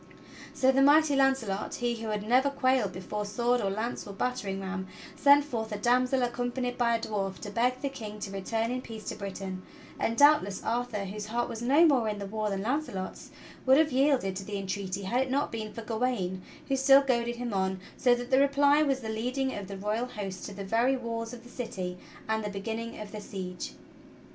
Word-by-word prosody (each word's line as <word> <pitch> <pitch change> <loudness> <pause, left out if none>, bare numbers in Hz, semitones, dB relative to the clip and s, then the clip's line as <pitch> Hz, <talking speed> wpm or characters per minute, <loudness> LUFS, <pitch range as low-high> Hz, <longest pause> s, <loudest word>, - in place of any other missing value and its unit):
So 265 -2 +4
the 270 +1 +3
mighty 290 +1 +6
Launcelot, 265 -7 +1
he 240 -1 -1
who 225 - -4
had 210 -1 -3
never 255 +4 +4
quailed 260 -6 +1
before 190 +3 -4
sword 240 +4 +1
or 195 - 0
lance 220 +4 -3
or 200 - -7
battering 200 -3 -2
ram, 190 0 -4 0.3
sent 285 0 +6
forth 225 -6 -4
a 210 - -2
damsel 250 +4 +2
accompanied 245 +1 -2
by 235 -1 +2
a - - 0
dwarf 195 -4 -3
to 205 - -6
beg 250 +4 +1
the 280 - 0
King 215 -5 -8
to 200 - -4
return 225 +4 -1
in 255 0 -2
peace 225 -3 -9
to - - -4
Britain; 195 -2 -5 0.4
and 230 +1 0
doubt 295 +1 +7
less 200 -1 -6
Arthur, 230 -3 -1
whose 210 +2 -6
heart 235 +2 -1
was 225 - -6
no 280 +8 +5
more 255 -8 +3
in 210 - -3
the 200 - -5
war 215 +1 -2
than 195 -1 -2
Launcelot's, 235 -7 -3 0.4
would 265 +1 +7
have 310 -1 +4
yielded 260 -7 +2
to 195 - -5
the 205 +1 -4
entreaty 195 0 -3
had 240 +7 +1
it 265 - -1
not 280 +2 0
been 220 -2 -4
for 230 - -7
Gawain 220 -6 -1 0.3
who 270 - +1
still 270 +1 +6
goaded 240 -3 0
him 240 -2 -4
on; 190 -1 0 0.2
so 245 -1 +4
that 245 +1 -6
the 260 - +6
reply 280 +1 +4
was 270 -3 +1
the 225 - -6
leading 255 +4 -1
of 200 -2 -5
the 195 0 -6
royal 210 +5 -1
host 195 -6 -6
to 205 - -8
the 200 0 -6
very 235 +6 +2
walls 230 -2 -4
of 245 -2 -10
the 245 - -14
city 185 -7 -5 0.3
and 220 0 0
the 210 - -2
beginning 225 +3 -5
of 210 -1 -7
the 215 - -6
siege. 185 -3 -6
230 Hz, 220 wpm, -29 LUFS, 200-255 Hz, 0.4 s, doubt